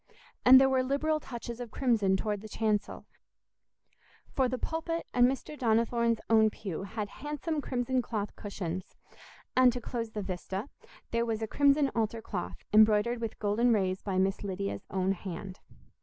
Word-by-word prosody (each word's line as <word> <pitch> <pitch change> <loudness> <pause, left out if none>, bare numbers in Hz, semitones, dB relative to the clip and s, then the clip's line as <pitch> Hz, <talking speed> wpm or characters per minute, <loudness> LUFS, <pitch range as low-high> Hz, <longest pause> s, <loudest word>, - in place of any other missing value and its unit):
And 260 +1 +9
there 265 - +5
were 265 -1 +2
liberal 285 +4 0
touches 235 -3 -7
of 245 -2 -6
crimson 215 -7 +2
toward 210 0 -2
the 215 - -9
chancel, 210 -1 -1 1.3
for 260 -2 +2
the 255 - -2
pulpit 325 +4 -3
and 245 0 +5
Mr. 270 +3 -3
Donnithorne's 230 -2 +1
own 220 -1 +5
pew 195 -6 -6
had 205 +2 -4
handsome 295 +1 -3
crimson 255 -1 0
cloth 210 -4 -4
cushions; 185 -3 -5 0.6
and, 255 -1 +6
to 245 - -4
close 230 -1 -4
the 210 -2 -5
vista, 190 +5 -4 0.4
there 230 0 +1
was 225 -1 -2
a - - -1
crimson 280 +3 +3
altar 225 0 -1
cloth, 190 -5 -5 0.2
embroidered 215 +2 +5
with 225 -1 -4
golden 215 +4 +2
rays 190 -3 0
by 195 -2 -2
Miss 190 +2 +1
Lydia's 195 0 -4
own 190 0 0
hand. 190 0 -6
225 Hz, 160 wpm, -30 LUFS, 205-255 Hz, 1.3 s, And